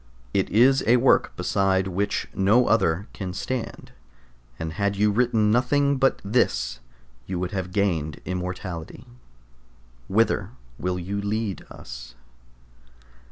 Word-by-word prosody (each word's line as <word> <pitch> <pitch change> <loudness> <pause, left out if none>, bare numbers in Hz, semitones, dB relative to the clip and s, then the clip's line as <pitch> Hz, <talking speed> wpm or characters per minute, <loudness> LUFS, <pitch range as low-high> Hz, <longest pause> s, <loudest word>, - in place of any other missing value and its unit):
It 95 - +1
is 130 +5 +4
a 120 +2 +6
work 125 +2 +3
beside 95 -1 +1
which 100 +2 -1
no 105 +6 +4
other 95 -2 +2
can 95 -3 -5
stand, 125 +3 -4 0.7
and 80 -1 -4
had 100 +2 0
you 105 +1 +3
written 110 -1 +2
nothing 140 +4 +2
but 135 0 +2
this 60 - +1 0.5
you 95 - -3
would 90 0 -2
have 95 -2 -3
gained 85 -7 0
immortality. 90 -2 -5 1.0
Whither 105 -2 +1 0.3
will 90 +1 -1
you 100 +3 -3
lead 105 -1 -2
us? - - -10
100 Hz, 120 wpm, -25 LUFS, 90-115 Hz, 1.0 s, a